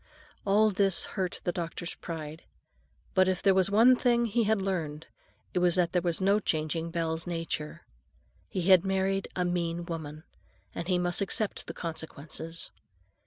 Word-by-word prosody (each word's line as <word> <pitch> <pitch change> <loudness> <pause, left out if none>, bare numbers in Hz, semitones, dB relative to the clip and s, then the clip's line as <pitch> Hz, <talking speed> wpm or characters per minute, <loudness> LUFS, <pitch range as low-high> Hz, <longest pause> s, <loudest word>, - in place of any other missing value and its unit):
All 210 +2 +4
this 195 -2 +3
hurt 185 -2 -3
the 175 - 0
doctor's 170 0 -4
pride. 160 -1 -7 0.7
But 185 -1 +4
if 185 -1 0
there 195 - +5
was 190 0 +3
one 230 +5 +6
thing 240 -1 +2
he 230 +1 +1
had 220 0 +2
learned, 165 -6 -3 0.5
it - - +1
was 175 -1 +3
that 175 -2 +2
there 180 - +1
was 170 -1 -1
no 200 +2 +3
changing 160 -2 -1
Belle's 165 0 -2
nature. 165 -3 -4 0.6
He 185 - -2
had 185 -1 +6
married 195 0 0
a 180 - 0
mean 170 -1 -1
woman; 155 -2 -6 0.5
and 170 - -5
he 185 -1 +2
must 175 +2 +1
accept 200 +2 -1
the - - -6
consequences. 165 0 -6
180 Hz, 165 wpm, -29 LUFS, 165-195 Hz, 0.7 s, one